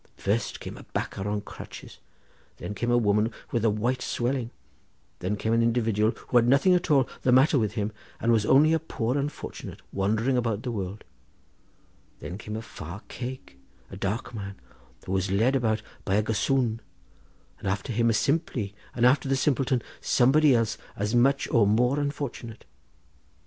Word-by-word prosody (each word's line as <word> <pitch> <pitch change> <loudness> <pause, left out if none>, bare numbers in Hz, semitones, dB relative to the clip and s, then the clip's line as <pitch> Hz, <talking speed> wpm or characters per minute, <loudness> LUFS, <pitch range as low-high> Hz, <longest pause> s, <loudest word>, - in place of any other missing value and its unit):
First 105 +4 -1
came - - -8
a - - -11
bacah 95 - -2
on 105 0 -1
crutches; - - -10 0.6
then - - -5
came 120 +3 -2
a 120 - +4
woman 105 0 +2 0.2
with 115 - 0
a 115 - +4
white 120 +5 0
swelling; 125 -1 -1 0.7
then 95 +4 -1
came 110 +2 -1
an 115 - +4
individual 115 -2 +2 0.2
who 125 - +4
had 120 0 +5
nothing 140 +8 +5
at 180 -1 +1
all 135 -4 +4
the 125 - +2
matter 135 +3 +5
with 105 -2 0
him, 105 -1 -2 0.3
and 115 - +2
was 110 -2 +3
only 150 +8 +5
a 160 - +3
poor 125 -6 -2
unfortunate, 145 +1 -5
wandering 110 +6 +1
about 115 -3 -1
the 125 - -2
world; 100 -1 -5 1.2
then 85 +7 -7
came 105 0 -6
a 110 - -5
far 90 0 -8
cake, 125 - -7 0.3
a - - -7
dark 105 +5 -3
man, 100 -3 -6 0.5
who - - -5
was 95 0 0
led 115 +8 +2
about 110 -4 +1 0.2
by 95 - 0
a 105 - +3
gossoon; 115 +2 0 0.8
after 100 +5 -2
him 115 +1 +2
a - - +3
simpley, 135 - 0 0.2
and 120 - +2
after 135 +1 +4
the 135 - +3
simpleton 135 -2 +1 0.2
somebody 135 +2 +4
else 115 -2 0 0.2
as 105 +2 -2
much 135 +3 +3
or 115 -4 +4
more 125 +7 +3
unfortunate. 140 -6 -4
115 Hz, 170 wpm, -27 LUFS, 105-130 Hz, 1.2 s, had